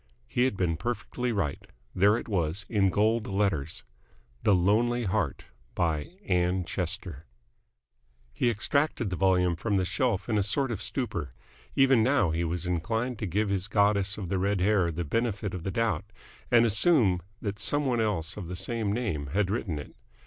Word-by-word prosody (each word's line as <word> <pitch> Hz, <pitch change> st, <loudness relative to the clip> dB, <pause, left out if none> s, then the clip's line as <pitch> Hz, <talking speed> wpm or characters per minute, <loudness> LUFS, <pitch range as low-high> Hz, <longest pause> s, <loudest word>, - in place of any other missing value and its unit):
He 125 Hz, -, +1 dB
had 130 Hz, -7 st, -1 dB
been 85 Hz, -3 st, 0 dB
perfectly 120 Hz, +5 st, -3 dB
right. 100 Hz, -10 st, -2 dB, 0.3 s
There 100 Hz, +4 st, +4 dB
it -, -, -6 dB
was, 90 Hz, -2 st, -1 dB
in 100 Hz, -4 st, +2 dB
gold 110 Hz, +4 st, +1 dB
letters. 95 Hz, -7 st, -1 dB, 0.6 s
THE 100 Hz, -, +4 dB
LONELY 115 Hz, +7 st, +2 dB
HEART 95 Hz, -7 st, -1 dB, 0.3 s
BY 80 Hz, -4 st, 0 dB, 0.2 s
ANN 90 Hz, -, +1 dB
CHESTER 85 Hz, -4 st, -4 dB, 1.1 s
He 120 Hz, -, +1 dB
extracted 120 Hz, 0 st, 0 dB
the -, -, -1 dB
volume 90 Hz, -2 st, +2 dB
from 100 Hz, +4 st, -1 dB
the 95 Hz, -, +1 dB
shelf 105 Hz, +1 st, 0 dB
in 110 Hz, -3 st, +1 dB
a -, -, +3 dB
sort 120 Hz, +7 st, 0 dB
of 105 Hz, -, -4 dB
stupor. 85 Hz, -, -3 dB, 0.4 s
Even 135 Hz, -3 st, +5 dB
now 110 Hz, -, +3 dB
he 80 Hz, +2 st, -1 dB
was 85 Hz, +1 st, -2 dB
inclined 110 Hz, +8 st, -1 dB
to 110 Hz, -, -2 dB
give 105 Hz, +4 st, 0 dB
his 100 Hz, -1 st, -1 dB
goddess 100 Hz, -1 st, +2 dB
of 100 Hz, -4 st, -5 dB
the 95 Hz, -1 st, 0 dB
red 100 Hz, +1 st, +1 dB
hair 95 Hz, -2 st, +3 dB
the 85 Hz, +1 st, -3 dB
benefit 105 Hz, +2 st, -1 dB
of 90 Hz, -, -4 dB
the 95 Hz, -, -3 dB
doubt, 110 Hz, -4 st, 0 dB, 0.4 s
and 120 Hz, -1 st, +5 dB
assume 110 Hz, -, +3 dB, 0.2 s
that 100 Hz, -1 st, -4 dB
some 145 Hz, 0 st, 0 dB
one 120 Hz, -3 st, +1 dB
else 90 Hz, -7 st, -1 dB
of 95 Hz, -5 st, -6 dB
the 90 Hz, -, -5 dB
same 105 Hz, +3 st, -2 dB
name 100 Hz, -, -2 dB
had 95 Hz, +6 st, 0 dB
written 100 Hz, -8 st, -2 dB
it. 75 Hz, -, -9 dB
100 Hz, 180 wpm, -28 LUFS, 90-115 Hz, 1.1 s, Even